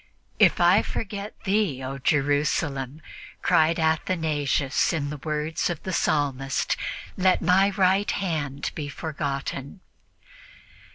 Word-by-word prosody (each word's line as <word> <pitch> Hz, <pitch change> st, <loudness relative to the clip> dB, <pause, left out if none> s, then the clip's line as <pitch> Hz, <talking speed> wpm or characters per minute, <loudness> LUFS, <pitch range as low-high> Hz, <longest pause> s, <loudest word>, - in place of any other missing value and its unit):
"If -, -, +5 dB
I -, -, +5 dB
forget 205 Hz, -1 st, -5 dB
thee, 195 Hz, -, 0 dB
O 135 Hz, +1 st, -5 dB
Jerusalem," 145 Hz, 0 st, 0 dB, 0.4 s
cried 160 Hz, +1 st, +3 dB
Athanasius 155 Hz, -4 st, +1 dB
in 145 Hz, -3 st, -2 dB
the 150 Hz, -, -5 dB
words 155 Hz, +3 st, -2 dB
of 170 Hz, -3 st, -4 dB
the 185 Hz, -, -4 dB
Psalmist, 135 Hz, -5 st, 0 dB, 0.4 s
"let 185 Hz, 0 st, +3 dB
my 185 Hz, +3 st, +4 dB
right 190 Hz, +1 st, +2 dB
hand 145 Hz, -7 st, -2 dB
be 145 Hz, -2 st, -5 dB
forgotten." 140 Hz, +1 st, -4 dB
155 Hz, 110 wpm, -25 LUFS, 140-180 Hz, 0.4 s, If